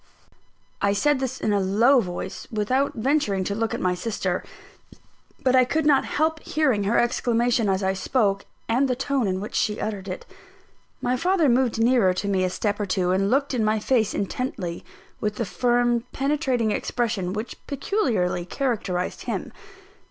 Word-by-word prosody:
I 200 0 +3
said 280 +7 +2
this 260 -1 -3
in 210 - 0
a 200 - +2
low 225 +8 +4
voice, 185 -2 -5
without 255 +6 0
venturing 225 -6 +1
to 200 - -2
look 225 +2 -1
at - - -4
my 180 -1 +1
sister. 205 +5 -2 1.0
But 260 -1 +3
I 255 - +7
could 305 +5 0
not 290 -3 +4
help 315 +1 0
hearing 265 -13 +1
her 220 +4 +2
exclamation 240 -2 +2
as 190 0 0
I 190 0 +1
spoke, 200 0 0 0.2
and 250 +5 +2
the 250 - 0
tone 270 -2 0
in 185 0 -1
which 210 - -6
she 210 - 0
uttered 200 -3 -4
it. 185 - -6 0.8
My 250 - +1
father 350 +3 +2
moved 250 -2 +2
nearer 225 -5 +3
to 200 - -3
me 190 -2 +1
a 185 - +1
step 205 +2 -2
or 205 - -2
two, 185 -1 +1
and 195 +2 +2
looked 275 +3 +1
in 235 -3 +1
my 215 +1 +2
face 220 0 +1
intently, 195 -5 -3 0.4
with 210 0 -2
the 230 - -2
firm, 240 +1 +1
penetrating 270 -5 0
expression 215 -6 -1
which 215 +4 -4
peculiarly 265 - 0
characterized 195 -4 -2
him. - - -3
225 Hz, 175 wpm, -24 LUFS, 200-260 Hz, 1.0 s, I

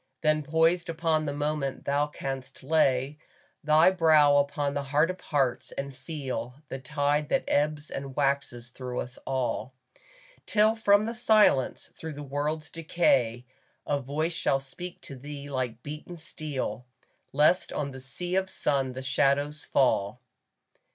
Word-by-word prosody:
Then 155 -1 +3
poised 165 +4 +2
upon 160 -1 +1
the 145 - -1
moment 145 -2 -2
thou 145 +1 +1
canst 135 -2 -6
lay 140 -1 +2 0.4
Thy 155 +4 +6
brow 155 -5 +5
upon 140 0 0
the 140 0 -2
Heart 150 +5 +2
of 185 - -11
Hearts, 135 -5 0
and 140 -1 -5
feel 130 -3 -5
The 135 - -5
tide 145 +2 0
that - - +2
ebbs 150 +1 0
and 135 -1 -6
waxes 140 -4 -1
through 125 -1 -5
us 125 +1 -9
all; 130 0 -2 0.7
Till 215 +1 +4
from 205 -2 +4
the 230 +2 -2
silence, 215 - +3
through 160 -1 -7
the 145 0 -7
world's 150 +3 -3
decay, 130 -8 +1 0.4
A 145 -1 0
voice 155 +6 -2
shall 135 -3 +1
speak 175 +7 -9
to 140 - -9
thee 145 +1 -8
like 125 -3 -3
beaten 150 +4 -7
steel, 155 -6 -5 0.4
Lest 150 +6 +3
on 140 -2 -3
thy 130 - -9
sea 155 +8 -6
of 190 0 +1
sun 135 -6 0
the 130 +1 -6
shadows 145 +2 +1
fall. 125 -4 +2
145 Hz, 150 wpm, -28 LUFS, 135-155 Hz, 0.7 s, Thy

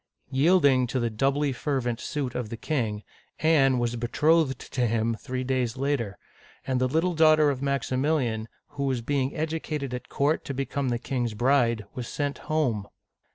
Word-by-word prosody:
Yielding 140 -3 +4
to 130 +2 -1
the 120 -1 -1
doubly 135 +5 +1
fervent 125 -3 -2
suit 140 -5 -3
of 120 -4 -3
the 115 - -5
king, 110 -8 -2 0.4
Anne 140 -5 +4
was 120 0 0
betrothed 150 +5 +2
to 125 -2 -2
him 115 +1 +1
three 130 +2 -4
days 125 -2 -1
later, 130 -7 -1 0.2
— - - -27
and 130 -1 0
the 130 - +3
little 165 +7 +1
daughter 155 -2 +5
of 130 -2 -5
Maximilian, 135 -4 0 0.2
who 140 -1 -3
was 130 -3 -1
being 135 +2 -1
educated 155 -3 -3
at 125 0 -6
court 145 +3 +1
to 140 - -4
become 135 0 -2
the 120 - 0
king's 120 -2 -2
bride, 120 -2 +2
was 125 -2 -5
sent 145 -1 -3
home 125 -10 0
130 Hz, 170 wpm, -26 LUFS, 120-145 Hz, 0.4 s, daughter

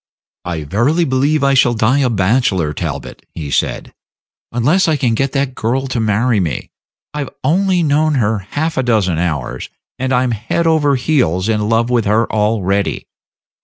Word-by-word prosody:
"I 85 -3 -3
verily 125 - +1
believe 140 +2 +1
I 140 0 +3
shall 125 -2 +3
die 115 +5 +2
a 130 -3 +2
bachelor, 95 - +1
Talbot," 70 -6 -6
he 75 -4 -6
said, - - -1 0.6
"unless 150 +11 +2
I 155 -2 +2
can 125 -4 +1
get 135 +4 0
that 135 -2 -1
girl 130 +3 -1
to 130 -3 -2
marry 110 +1 +1
me. 80 -8 -3 0.4
I've 145 -3 -4
only 185 +1 +2
known 150 0 +2
her 110 -4 +1
half 150 - -3
a - - +3
dozen 105 -9 +1
hours, 85 -4 -3 0.3
and 130 +1 -1
I'm 125 -1 +2
head 115 +9 -2
over 155 -3 +3
heels 125 - +1
in 105 -1 0
love 115 +1 +1
with 120 -3 +1
her 110 +3 +2
already. 105 -2 0
120 Hz, 165 wpm, -16 LUFS, 100-140 Hz, 0.6 s, I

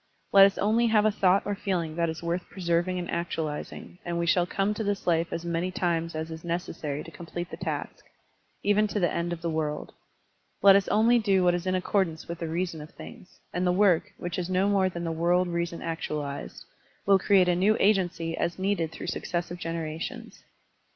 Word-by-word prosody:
Let 195 0 +9
us 195 - -4
only 225 +3 +2
have 215 -2 +3
a 215 - +4
thought 195 -1 +3
or 205 - -1
feeling 175 -5 -2
that 170 -1 +1
is 160 +1 -6
worth 170 +2 -2
preserv 170 -2 0
ing 185 0 -2
and 175 -1 -3
actualizing, 165 0 -4
and 170 -1 -3
we 170 - 0
shall 175 +1 +3
come 195 +3 0
to 220 - -3
this 200 -1 -2
life 165 -1 +2
as 170 - -4
many 170 +1 -1
times 170 -3 -1
as 160 +1 -4
is 160 0 -8
necessary 165 -4 -3
to 165 - -11
complete 175 +1 -7
the - - -6
task, - - -4 0.6
even 210 +1 +3
to 205 - -2
the 175 - +2
end 170 0 -1
of 170 -1 -5
the 170 - 0
world. 150 -1 -3 0.7
Let 195 -1 +9
us 200 -1 +3
only 230 +3 +4
do 195 -4 +2
what 175 0 +4
is 175 +1 -2
in 185 - +1
accordance 185 -3 0
with 170 0 -6
the 165 - -3
reason 165 -1 -2
of 150 - -10
things, 210 -6 -13
and 180 +1 0
the - - +4
work, 185 -2 +3
which 175 +2 -4
is 180 0 -3
no 185 +2 +2
more 195 -2 +3
than 170 -1 -6
the 165 - -2
world 175 +3 +2
reason 170 -1 -3
actualized, 150 -4 -4 0.4
will 195 -1 +5
create 190 -1 +4
a 180 - +3
new 200 +5 +3
agency 180 -5 +1
as 170 - -2
needed 190 -4 0
through - - -8
successive 175 0 -3
generations. 165 -1 -5
175 Hz, 210 wpm, -27 LUFS, 165-195 Hz, 0.7 s, Let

